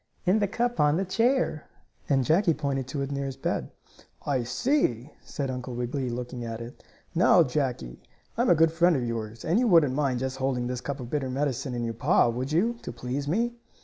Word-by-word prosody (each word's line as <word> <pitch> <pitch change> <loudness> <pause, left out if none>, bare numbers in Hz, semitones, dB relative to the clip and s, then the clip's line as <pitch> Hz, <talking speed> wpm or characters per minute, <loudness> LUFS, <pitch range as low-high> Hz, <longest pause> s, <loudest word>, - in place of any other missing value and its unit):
"In 185 +4 +4
that 205 -2 0
cup 240 +1 -1
on 150 +1 +4
the 195 - 0
chair," 230 - +1 0.4
and 135 -2 +3
Jackie 165 - +3
pointed 135 -4 -2
to 140 +1 -3
it 135 - -4
near 140 0 -2
his 135 -1 -6
bed. - - -2 0.6
"I 135 -3 +1
see," 130 - 0
said 135 -3 -4
Uncle 125 -1 -5
Wiggily, 125 +2 -2
looking 120 0 -5
at 115 -1 -5
it. 115 +1 -10 0.3
"Now, 175 0 +5
Jackie, 125 - -3 0.3
I'm - - +2
a 175 - +6
good 165 0 +4
friend 170 +1 +3
of 125 -3 -1
yours, 115 -1 -5
and 170 +7 +2
you 250 - +2
wouldn't 165 - +5
mind 135 -3 0
just 130 0 -3
holding 130 -2 -1
this 125 0 -3
cup 140 +1 -4
of 120 - -8
bitter 140 -3 -1
medicine 135 -1 -2
in 120 - -2
your 115 -1 -2
paw, 115 - +3
would 125 +4 -3
you, 225 +9 +1
to - - -6
please 125 +4 -4
me?" 230 +9 0
135 Hz, 210 wpm, -27 LUFS, 125-165 Hz, 0.6 s, a